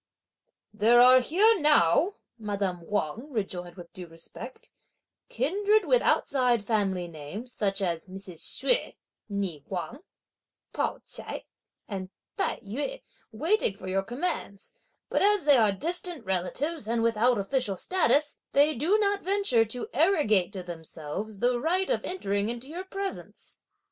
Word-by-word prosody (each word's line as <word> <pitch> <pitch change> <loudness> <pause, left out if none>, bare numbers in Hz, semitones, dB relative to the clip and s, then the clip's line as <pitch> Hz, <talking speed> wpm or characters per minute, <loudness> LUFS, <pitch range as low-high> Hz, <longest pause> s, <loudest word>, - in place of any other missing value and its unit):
"There 225 +3 +5
are 255 +1 +8
here 400 - +4
now," 300 - +4 0.2
madame 200 -4 -2
Wang 210 - -2
rejoined 180 -6 -4
with 175 -2 -12
due 180 -2 -8
respect, 165 0 -9 0.6
"kindred 415 - +2
with - - +4
outside 245 -5 +2
family 195 -5 0
names, 170 - -8
such 195 -1 0
as 170 -1 -2
Mrs. 185 -3 -10
Hsüeh, - - +1 0.4
née 195 -7 -2
Wang, 195 +8 -5 0.7
Pao - - -1
ch'ai, - - -5 0.4
and 190 -3 -5 0.3
Tai - - -1
yü 290 - -4 0.3
waiting 315 - +1
for 185 - -9
your 190 +1 +1
commands; 235 - -4 0.3
but - - 0
as 410 -2 +3
they 290 -2 +7
are 215 -3 +4
distant 335 - -2
relatives, 215 - -2
and 230 0 0
without 230 +2 +3
official 205 -1 -1
status, 300 - +2
they 290 +2 +4
do 320 - +2
not 405 -1 +1
venture 380 - +2
to 240 +3 -3
arrogate 265 - +3
to 185 -2 -5
themselves 170 +4 -7
the 245 +3 +1
right 365 - 0
of - - 0
entering 205 - -1
into 240 +2 -5
your 350 +5 -6
presence." 390 0 -7
230 Hz, 140 wpm, -27 LUFS, 195-320 Hz, 0.7 s, are